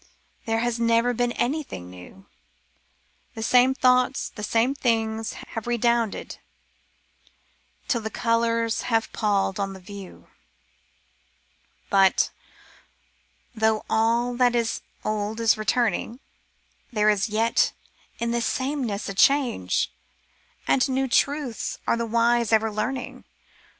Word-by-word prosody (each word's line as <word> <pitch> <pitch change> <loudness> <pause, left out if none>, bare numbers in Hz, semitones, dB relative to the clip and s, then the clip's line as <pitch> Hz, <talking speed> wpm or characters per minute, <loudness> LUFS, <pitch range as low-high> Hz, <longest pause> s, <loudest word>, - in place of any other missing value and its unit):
There 225 0 +1
has 240 -1 -1
never 230 +1 +2
been 245 +1 0
anything 250 - -3
new 90 - -13 0.6
— - - -40
The 225 - -4
same 250 +3 +4
thoughts, 255 0 +2
the 210 - -10
same 230 +5 +1
things, 225 -4 -1 0.2
have 225 0 -6
redounded 235 -2 0 1.5
Till 235 - 0
thp 220 0 -5
colours 230 -1 0
have 225 -1 0
pall'd 200 -2 0
on 195 -1 -2
the 190 - -10
view. 195 0 -11 1.6
But 195 -1 +4 0.6
— - - -40
though 220 -1 +1
all 235 +2 +2
that 245 -1 +3
is 230 -1 0 0.2
old 215 +1 -2
is 225 -2 +4
returning. 230 +2 -1 0.7
There 215 -2 +3
is 210 +2 0
yet 225 +2 +2 0.5
in 235 0 -2
this 235 0 0
sameness 260 -6 -2
a 195 - -4
change; 240 - +2 0.8
And 270 +1 +3
new 265 +1 0
truths 275 -1 0
are - - +2
the 235 0 -2
wise 235 0 +2
ever 220 0 +3
learning. 245 +5 -4
230 Hz, 120 wpm, -24 LUFS, 215-245 Hz, 1.6 s, same